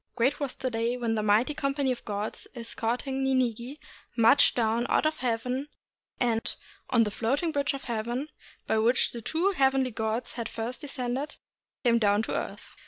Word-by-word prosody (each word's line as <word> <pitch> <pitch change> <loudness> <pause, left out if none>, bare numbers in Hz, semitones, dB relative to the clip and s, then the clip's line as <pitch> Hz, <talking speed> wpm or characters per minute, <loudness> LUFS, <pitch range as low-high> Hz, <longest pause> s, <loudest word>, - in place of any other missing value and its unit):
Great 260 +5 +2
was 280 -3 -3
the 255 -1 -3
day 230 +2 0
when 230 -2 0
a 215 - 0
mighty 215 +7 +3
company 275 -2 0
of 245 - -4
gods 210 0 -4
escorting 245 +3 -2
Ninigi 255 0 0 0.4
marched 230 +4 +6
down 230 0 +1
out - - +3
of 310 0 0
heaven, 250 +3 -1 0.5
and, 230 -2 0 0.3
on 235 -2 +5
the 210 - -1
Floating 275 - 0
Bridge 280 -3 0
of 275 - -7
Heaven 240 +5 -2 0.4
by 220 - +2
which 235 +3 +3
the 235 - -6
two 335 - +1
hea 270 -8 +4
venly 265 -1 0
gods 220 +2 -2
had 230 -2 -4
first 235 +4 -4
descended, 270 0 -3 0.5
came 235 -2 +4
down 205 0 +3
to - - -4
the - - 0
earth. - - -8
245 Hz, 180 wpm, -28 LUFS, 225-270 Hz, 0.5 s, marched